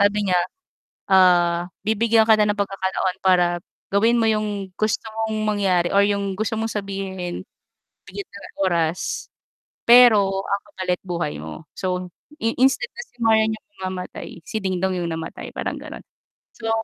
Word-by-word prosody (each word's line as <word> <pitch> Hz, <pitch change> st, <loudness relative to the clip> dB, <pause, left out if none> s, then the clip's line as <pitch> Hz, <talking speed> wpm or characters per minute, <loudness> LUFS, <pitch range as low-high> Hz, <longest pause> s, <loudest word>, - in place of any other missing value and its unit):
sabi 205 Hz, 0 st, +2 dB
niya, 180 Hz, -, +4 dB, 0.7 s
ah, 175 Hz, -2 st, +4 dB, 0.2 s
bibigyan 220 Hz, +1 st, +3 dB
ka 220 Hz, -, +8 dB
na 210 Hz, -, +4 dB
ng 205 Hz, -, 0 dB
pagkakataon 190 Hz, -2 st, -1 dB
para 180 Hz, -2 st, +5 dB, 0.5 s
gawin 225 Hz, +4 st, +4 dB
mo -, -, +2 dB
yung 205 Hz, -3 st, -2 dB
gusto 215 Hz, -1 st, 0 dB, 0.2 s
mong 220 Hz, -, -2 dB
mangyari 190 Hz, -5 st, +2 dB
or 200 Hz, -, +5 dB
yung 200 Hz, -1 st, -1 dB
gusto 220 Hz, +1 st, -1 dB
mong 225 Hz, 0 st, -2 dB
sabihin, 195 Hz, -3 st, -4 dB, 0.6 s
bigyan 405 Hz, -, -7 dB
kita 200 Hz, -, -12 dB
ng -, -, -21 dB
oras, 170 Hz, -1 st, -1 dB, 0.6 s
pero 210 Hz, -6 st, +7 dB
ang 200 Hz, 0 st, -1 dB
kapalit 180 Hz, -2 st, -2 dB
buhay 170 Hz, -, -3 dB
mo. 80 Hz, -, -9 dB
So, 180 Hz, -1 st, -2 dB, 0.3 s
i 225 Hz, 0 st, +1 dB
instead 265 Hz, +1 st, +3 dB
na 480 Hz, -, -7 dB
si -, -, -35 dB
Marian 220 Hz, -1 st, +3 dB
yung -, -, -27 dB, 0.2 s
mamamatay 185 Hz, -2 st, -6 dB
si 220 Hz, -, -3 dB
Dingdong 190 Hz, -1 st, -1 dB
yung 170 Hz, -, -2 dB
namatay, 160 Hz, 0 st, -6 dB
parang -, -, -3 dB
gano'n. -, -, -9 dB, 0.5 s
So 225 Hz, -1 st, -4 dB
195 Hz, 155 wpm, -22 LUFS, 180-215 Hz, 0.7 s, ka